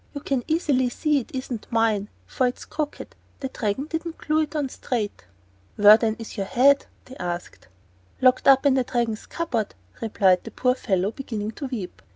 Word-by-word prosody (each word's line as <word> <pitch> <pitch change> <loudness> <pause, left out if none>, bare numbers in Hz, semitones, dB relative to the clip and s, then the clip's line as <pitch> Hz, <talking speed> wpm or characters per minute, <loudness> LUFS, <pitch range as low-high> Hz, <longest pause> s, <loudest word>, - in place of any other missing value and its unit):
You 285 - -4
can 270 -4 -1
easily 285 -6 +2
see 300 +3 +1
it 240 - -8
isn't 255 -4 -5
mine, 220 -3 +1 0.2
for 255 - 0
it's 245 - -5
crooked; 300 -1 -5 0.2
the 265 - -4
Dragon 225 +3 -2
didn't 325 +1 -4
glue 310 +1 +1
it 310 0 -3
on 290 -2 0
straight." 225 - -4 0.5
"Where, 210 +1 +9
then, 220 -1 0
is 225 0 -9
your 195 -1 -2
own - - -15
head?" 275 +2 +5 0.2
they 260 - -11
asked. 175 -1 -5 0.5
"Locked 255 +1 +4
up 270 +1 +6
in 280 - +5
the 260 -1 +2
Dragon's 235 -3 -2
cupboard," 245 -11 -2 0.3
replied 195 -5 +3
the - - -7
poor 250 0 +1
fellow, 195 -5 0
beginning 220 -5 -4
to 275 +4 -6
weep. 225 -8 -6
250 Hz, 190 wpm, -24 LUFS, 215-275 Hz, 0.5 s, Where